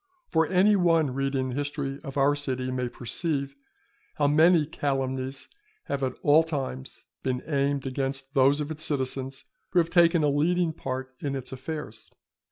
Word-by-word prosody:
For 160 -2 +3
any 190 +3 +4
one 165 -7 +3
reading 135 -1 -1
the - - -4
history 145 -1 -3
of 135 -2 -7
our 140 +1 +4
city 130 -3 -2
may 125 -1 -2
perceive, 140 +3 -3 0.6
how 145 - +1
many 155 +2 +5
calumnies 135 -3 -3 0.4
have 140 - -3
at 130 -1 -2
all 150 +2 +6
times 135 -5 -5 0.2
been 125 -1 -2
aimed 140 -2 0
against 135 +1 -3
those 140 +1 +4
of 150 +1 -4
its 155 0 0
citizens 135 -2 -1 0.3
who - - +1
have 165 -1 +3
taken 170 -2 +4
a - - +4
leading 165 +4 +1
part 130 -2 -5
in 140 -1 -3
its 130 -2 -5
affairs. 130 -5 -7
140 Hz, 165 wpm, -27 LUFS, 130-155 Hz, 0.6 s, all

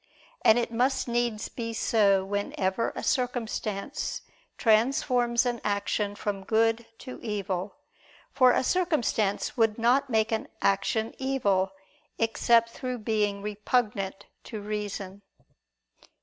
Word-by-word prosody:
And 220 - +6
it 235 -1 -1
must 255 +4 +1
needs 235 -2 -1
be 230 -1 -5
so 200 -4 +3
whenever 200 +1 -1
a - - -5
circumstance 245 -1 -2 0.3
transforms 240 +1 +2
an 240 -2 -1
action 205 0 -1
from 205 -1 -3
good 225 +2 +1
to 255 - -9
evil; 200 -3 -3 0.6
for 255 -2 +5
a - - +2
circumstance 260 - 0
would 225 -2 +3
not 255 +4 +3
make 220 -1 +1
an 220 - -1
action 210 +3 +1
evil, 200 -8 +1 0.4
except 230 0 +3
through 255 0 -4
being 210 -2 -1
repugnant 205 -2 -1 0.2
to 220 - -6
reason. 205 -2 -5
225 Hz, 115 wpm, -27 LUFS, 205-240 Hz, 0.6 s, And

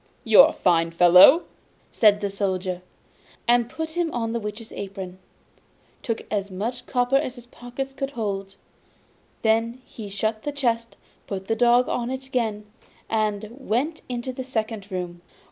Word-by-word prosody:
'You - - +8
are - - +6
a - - -6
fine 165 -2 +2
fellow!' 180 - +7 0.5
said 210 -2 +4
the 200 -1 -2
Soldier, 185 -2 -2 0.7
and 240 0 +3
put 320 +4 -4
him 340 -1 -1
on 230 -2 -2
the 235 - -1
Witch's 210 +1 -7
apron, 190 -2 -7 0.8
took 230 -2 -3
as 200 -1 -1
much 235 +6 -4
copper 250 +1 +2
as 275 -3 -2
his 245 -2 -12
pockets 245 +3 -7
could 270 0 -3
hold; 195 -6 -4 0.9
then 225 +2 +1
he 215 -3 -9
shut 215 +2 -2
the 290 - -3
chest, 235 -5 -1 0.3
put 195 -1 -5
the 225 - 0
dog 245 +1 +4
on 240 0 -2
it 265 +1 -5
again, 225 -5 -2 0.5
and 215 -1 0
went 265 +5 -2
into 245 +1 -4
the 260 - -5
second 220 -5 -4
room. 175 -2 -5
225 Hz, 160 wpm, -24 LUFS, 200-250 Hz, 0.9 s, You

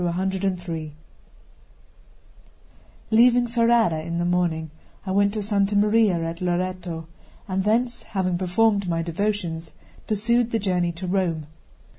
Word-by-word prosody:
C 180 -3 -2 2.2
LEAVING 240 +2 +5
Ferrara 230 -8 +2
in 170 +1 -4
the 175 - 0
morning, 170 -3 0 0.3
I 190 - -3
went 200 +1 +3
to 210 - -2
Santa 200 0 +1
Maria 210 -1 +4
at 165 +1 -5
Loreto; 180 -2 -2 0.4
and 190 -1 -1
thence, 240 +4 +1
having 185 -3 -2
performed 200 +1 +2
my 165 -1 0
devotions, 170 -2 -3 0.3
pursued 235 +3 +2
the 230 - 0
journey 180 -4 0
to 170 +3 -6
Rome. 175 -4 -1
190 Hz, 120 wpm, -24 LUFS, 170-215 Hz, 2.2 s, LEAVING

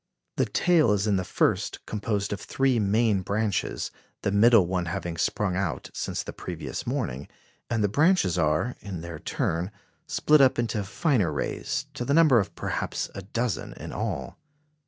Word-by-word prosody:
The - - +2
tail 165 -11 +3
is 100 0 0
in 105 -2 +2
the 95 - -1
first - - 0
composed 105 -1 -2
of 100 - -5
three 135 -3 +1
main 105 0 +2
branches, 105 +2 -1 0.3
the 100 - +1
middle 110 -1 +6
one 90 0 -1
having 85 0 -3
sprung 90 +3 0
out 95 -4 -2
since - - -3
the - - -7
previous - - -6
morning, 65 +4 -2 0.4
and 115 -3 +1
the - - +4
branches 150 - +3
are, 80 +8 +1
in 95 -5 -6
their 85 -2 -7
turn, 85 +4 -1 0.4
split 150 -1 +4
up 130 -1 +5
into 115 -3 -1
finer 105 - +1
rays, 75 - -2
to - - -4
the 140 +4 +1
number 155 -7 +6
of 100 - -3
perhaps - - -3
a 100 - -6
dozen 115 +4 -3
in - - -8
all. - - -4
105 Hz, 170 wpm, -26 LUFS, 90-120 Hz, 0.4 s, middle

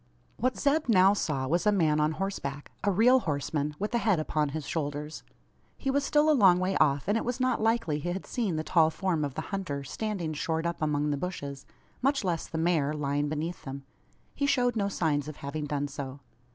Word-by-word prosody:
What 255 +2 0
Zeb 290 -1 +1
now 195 -2 +6
saw 150 -9 -1
was 170 +8 +1
a - - +6
man 160 -6 +2
on 150 +1 +2
horseback 150 -6 -4
a 205 - +2
real 235 +7 +5
horseman, 150 - -2
with 210 +7 -3
a 235 - +3
head 210 -7 +2
upon 155 -1 0
his 155 0 -5
shoulders. 150 -1 -4 0.6
He 270 - -1
was 285 +1 +1
still 295 +2 +3
a 310 - +6
long 195 -10 +6
way 185 +1 0
off; 140 -1 +2
and 205 - +2
it - - -4
was 245 +2 -2
not 255 -3 +1
likely 225 -9 +1
he 175 - -3
had 185 +2 -4
seen 220 -9 -1
the 155 - -1
tall 160 -1 +4
form 165 -1 -1
of 140 -2 -3
the 155 - -2
hunter, 145 -8 -3
standing 180 +1 -3
shored 160 +1 -2
up 170 -1 -2
among 150 -1 +1
the 145 - 0
bushes 140 -5 -5 0.3
much 275 -1 +2
less 175 -3 -1
the 160 - -5
mare, 160 -3 +1
lying 145 0 -1
beneath 160 +4 -4
them. 135 0 -7 0.5
He 280 - 0
showed 245 -4 +2
no 200 -2 0
signs 150 -6 0
of 155 - -6
having 150 +2 -5
done 145 -1 -2
so. 140 -1 -7
165 Hz, 220 wpm, -29 LUFS, 145-210 Hz, 0.6 s, now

